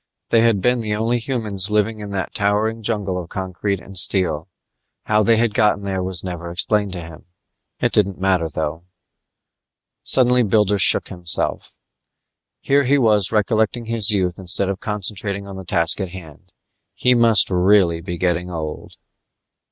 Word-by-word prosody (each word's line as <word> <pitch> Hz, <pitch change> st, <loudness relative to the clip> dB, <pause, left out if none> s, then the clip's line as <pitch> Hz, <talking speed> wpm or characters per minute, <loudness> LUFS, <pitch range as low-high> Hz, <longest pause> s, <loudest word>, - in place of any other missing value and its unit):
They 115 Hz, -, +3 dB
had 115 Hz, -4 st, +2 dB
been 125 Hz, +2 st, +1 dB
the 105 Hz, -1 st, -3 dB
only 115 Hz, +3 st, -1 dB
humans 110 Hz, -6 st, -2 dB
living 105 Hz, +1 st, 0 dB
in 105 Hz, -1 st, -7 dB
that 100 Hz, -2 st, -4 dB
towering 105 Hz, +2 st, 0 dB
jungle 100 Hz, -4 st, -3 dB
of 85 Hz, -, -12 dB
concrete 95 Hz, +1 st, -4 dB
and 95 Hz, -, -14 dB
steel. 85 Hz, -4 st, +2 dB, 0.6 s
How 105 Hz, 0 st, +1 dB
they 115 Hz, +2 st, +3 dB
had 115 Hz, -1 st, 0 dB
gotten 105 Hz, -2 st, +1 dB
there 95 Hz, -1 st, -3 dB
was 90 Hz, -2 st, -4 dB
never 90 Hz, -2 st, -6 dB
explained 100 Hz, +3 st, 0 dB
to 90 Hz, -, -6 dB
him. 80 Hz, -1 st, -12 dB, 0.5 s
It -, -, 0 dB
didn't 100 Hz, -3 st, 0 dB
matter, 95 Hz, -4 st, 0 dB
though. 80 Hz, +2 st, -5 dB, 1.2 s
Suddenly 125 Hz, -1 st, +4 dB
Builder 105 Hz, -2 st, +1 dB
shook -, -, +4 dB
himself. 85 Hz, -3 st, -2 dB, 0.8 s
Here 140 Hz, 0 st, +2 dB
he 140 Hz, +3 st, +3 dB
was 105 Hz, -6 st, +2 dB
recollecting 110 Hz, +2 st, 0 dB
his 115 Hz, -2 st, 0 dB
youth 95 Hz, -4 st, -1 dB
instead 95 Hz, +1 st, +3 dB
of 95 Hz, -1 st, -4 dB
concentrating 100 Hz, -1 st, -2 dB
on 100 Hz, -1 st, -9 dB
the 95 Hz, -, -9 dB
task 85 Hz, +3 st, +3 dB
at 95 Hz, -, -4 dB
hand. 85 Hz, -5 st, -13 dB, 0.4 s
He 125 Hz, -, +2 dB
must 115 Hz, -5 st, +4 dB
really 90 Hz, -2 st, +2 dB
be 85 Hz, 0 st, -6 dB
getting 90 Hz, 0 st, -1 dB
old. 80 Hz, -3 st, -7 dB
100 Hz, 160 wpm, -19 LUFS, 90-110 Hz, 1.2 s, Suddenly